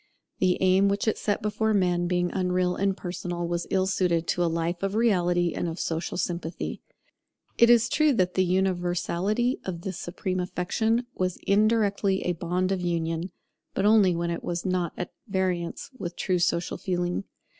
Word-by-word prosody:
The 185 -1 +3
aim 190 +1 +4
which 200 +2 -1
it 220 - +1
set 205 -1 -1
before 215 +1 +1
men, 175 -2 +2
being 175 0 0
unreal 180 -1 0
and 195 -1 0
personal, 175 -1 -4
was 170 0 -2
ill 190 -1 +2
suited 180 -3 +1
to 175 - +1
a 170 - +2
life 170 +1 -2
of 195 +1 -1
reality 175 -6 +2
and - - -2
of 165 - -6
social 165 +1 -2
sympathy. 170 -2 -3 0.8
It 235 - +7
is 240 -1 +6
true 305 +3 +3
that 185 -6 +1
the 185 - +3
universality 185 +5 0
of 175 -3 -5
this 190 -1 -5
supreme 185 +1 -3
affection 210 +6 0
was 185 -1 -1
indirectly 205 -2 +2
a 180 - 0
bond 180 +2 -1
of 190 -2 0
union; 170 0 -2 0.4
but - - +1
only 205 -4 +5
when 170 0 -1
it 170 - -4
was 175 +1 -3
not 180 -3 0
at 180 - -4 0.2
variance 185 0 -2
with 175 -1 -5
true 185 -3 0
social 170 -1 0
feeling. 180 +1 -2
180 Hz, 175 wpm, -26 LUFS, 175-195 Hz, 0.8 s, It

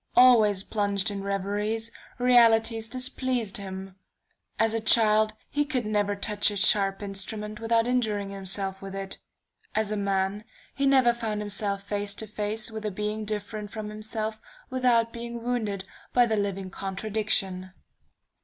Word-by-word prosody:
Always 220 -6 +6
plunged 200 -1 0
in 200 -1 -4
reveries, 205 +3 -2 0.3
realities 230 -2 +4
displeased 255 -3 -1
him. 190 -1 -7 0.6
As 225 0 +2
a 225 - +1
child 215 -1 +4
he 290 - 0
could 265 -6 -2
never 205 -1 +1
touch 205 +1 +1
a 205 - -4
sharp 195 0 +3
instrument 210 +2 -3
without 230 0 +2
injuring 215 -5 0
himself 195 0 -2
with 195 0 -7
it; 195 0 -6 0.6
as 215 -1 +1
a - - 0
man, 200 +1 0 0.3
he 275 0 +1
never 260 -3 +5
found 225 -3 -3
himself 200 -1 -2
face 205 0 -2
to 220 - -4
face 215 +1 -3
with 220 -1 -6
a 210 - -1
being 210 +2 -3
different 210 0 -4
from 215 0 -6
himself 215 0 -4 0.3
without 240 -3 +2
being 235 0 -6
wounded 215 -6 -2 0.3
by 245 -1 +6
the 220 -2 0
living 195 -2 -2
contradiction... 195 -2 -2
210 Hz, 145 wpm, -27 LUFS, 200-225 Hz, 0.6 s, Always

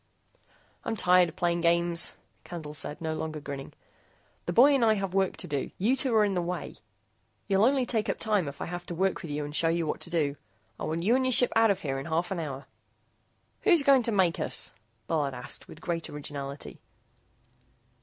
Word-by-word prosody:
"I'm - - -2
tired 180 -3 +5
of - - -13
playing 175 -2 0
games," 170 0 +2 0.3
Candle 160 -4 -7
said, 150 0 -5
no 160 -1 -2
longer 155 -1 -4
grinning. 140 -2 -7 0.8
"The - - 0
boy 260 +10 +6
and 270 -4 +3
I 220 -1 +5
have 195 -2 -3
work 190 -1 +1
to - - -7
do. 145 -2 -2
You 225 +8 +2
two 260 -3 +1
are 215 -1 +5
in 200 - 0
the 180 - 0
way. 180 +1 -4 0.7
You'll 200 +1 +4
only 265 0 +3
take 225 -3 0
up - - 0
time 210 -7 +1
if 140 - -7
I - - -2
have 175 0 -6
to 175 - -4
work 190 +2 0
with 165 - -7
you 145 0 -2
and 145 0 -7
show 165 - +3
you 165 0 0
what 150 - -2
to - - -7
do. 150 -4 0 0.4
I - - -3
want 165 +2 -2
you 225 +6 +4
and 260 - +2
your 255 - +2
ship 245 - +4
out 225 0 +5
of 200 - +1
here 135 -2 -2
in 135 - -6
half 170 +3 -1
an 190 - -2
hour." 140 -4 -5 1.0
"Who's 340 -5 +5
going 275 -2 +6
to 230 - 0
make 185 -5 +2
us?" - - -2 0.3
Bullard 145 -5 -1
asked 125 0 -5
with - - -13
great 165 -2 -3
originality. 140 -1 -7
175 Hz, 215 wpm, -28 LUFS, 155-210 Hz, 1.0 s, boy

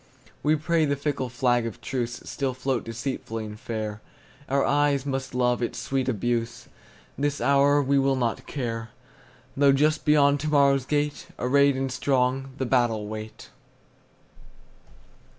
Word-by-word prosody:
We 150 +1 +3
pray 160 +1 +1
the 140 -1 0
fickle 140 -2 -2
flag 120 -1 +1
of 115 - -8
truceStill 125 +1 -3
float 130 -1 -1
deceitfully 115 -1 -4
and 105 0 -9
fair; 110 -2 -4 0.5
Our 140 +1 +2
eyes 145 -1 +2
must 135 -2 -3
love 125 -1 +1
its 120 - -2
sweet 135 -1 -1
abuse; 115 0 -2 0.5
This 145 0 0
hour 140 +1 +4
we 140 +1 +2
will 135 0 +2
not 120 -3 -2
care, 115 -5 -4 0.7
Though 140 0 +5
just 150 +3 +2
beyond 145 -2 +4
to 155 - -3
morrow's 140 -3 +3
gate, 145 +1 -1
Arrayed 140 +2 +3
and 135 0 -2
strong, 130 0 0
the 130 - -1
battle 120 -4 +1
wait. 110 0 -8
135 Hz, 140 wpm, -25 LUFS, 120-140 Hz, 0.7 s, Though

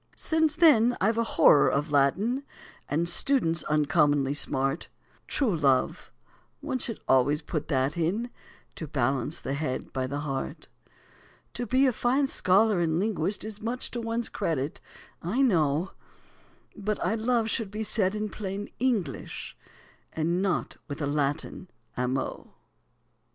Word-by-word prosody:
Since 315 -2 +1
then 245 -8 +5
I've 220 +4 +2
a - - +3
horror 150 -9 +5
of 145 +2 -1
Latin, 195 - +2 0.5
And 165 +4 0
students 170 - +1
uncommonly 145 -2 +2
smart; 135 +1 0 0.4
True 240 -10 +1
love, 135 -5 +1 0.5
one 280 -3 -3
should 230 -2 -3
always 135 +3 +3
put 155 -3 -3
that 135 -1 0
in, 195 +9 -1 0.5
To 160 - -5
balance 135 +2 -1
the 135 - -4
head 140 -3 -3
by 130 -1 -1
the 140 +2 -3
heart. 135 -3 -4 0.9
To 245 0 -4
be 260 +4 +3
a 255 - +3
fine 255 +5 +2
scholar 205 -4 +3
and 165 -2 +1
linguist 200 -2 -1
Is 215 -1 -7
much 235 +3 -2
to 240 - -3
one's 230 0 -2
credit, 145 -2 -2 0.4
I 220 +11 +1
know, 165 - +2 0.8
But 210 0 -2
"I - - +1
love" 225 0 +1
should 225 -4 -2
be 215 +2 -4
said 205 -2 +1
in 215 0 -2
plain 205 0 -5
English, 220 - -2 0.6
And 170 +3 0
not 195 -2 -1
with 145 -1 -6
a - - +1
Latin 145 +5 -2 0.3
"amo." 125 +1 -3
180 Hz, 140 wpm, -27 LUFS, 145-225 Hz, 0.9 s, then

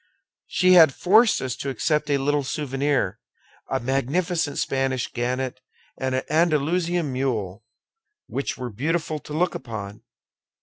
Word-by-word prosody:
She 185 -1 +3
had 165 -7 +7
forced 220 - +4
us 130 -2 -2
to 140 - -4
accept 150 +2 0
a 140 - +3
little 145 +1 0
souvenir, 135 - -1 0.5
a 135 - 0
magnificent 145 +5 -1
Spanish 135 -2 -1
genet 125 +1 -2 0.4
and 130 0 -2
an 130 - -1
Andalusian 165 0 +1
mule, 115 -6 -2 0.6
which 140 - -3
were 125 -1 -5
beautiful 155 +6 -1
to 150 - -10
look 175 +3 +1
upon. 105 -3 -7
140 Hz, 130 wpm, -24 LUFS, 130-160 Hz, 0.6 s, had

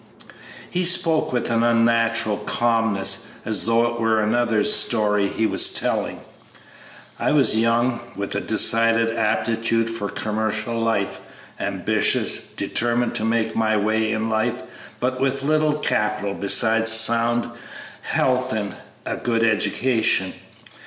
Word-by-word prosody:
He 180 +1 -1
spoke 170 -3 +1
with 120 -1 -2
an 115 0 +2
unnatural 115 -2 +1
calmness, 110 -5 0 0.2
as 110 -2 0
though 115 +1 +2
it 120 0 -3
were 110 -1 +1
another's 110 -1 +2
story 105 -3 +2
he 110 - -1
was - - +2
telling. - - -2 1.0
"I - - 0
was 135 -7 +3
young, 115 +2 +1 0.2
with 100 0 -4
a 100 - -2
decided 115 +1 +2
aptitude 115 +1 0
for 105 -3 -4
commercial 110 +1 -3
life, 115 -4 -1 0.4
ambitious, - - 0
determined 120 +1 -2
to - - -3
make 110 0 -1
my 110 -1 +1
way 110 +1 0
in 110 0 -1
life, 110 +2 -1 0.4
but 130 +1 -2
with 135 0 -1
little 155 +1 +2
capital 105 -8 -1
besides 115 +3 +2
sound 115 +1 +2 0.5
health 130 0 0
and 105 -2 -3 0.3
a - - -3
good 115 -2 -1
education. 110 -3 +1
115 Hz, 125 wpm, -21 LUFS, 110-120 Hz, 1.0 s, was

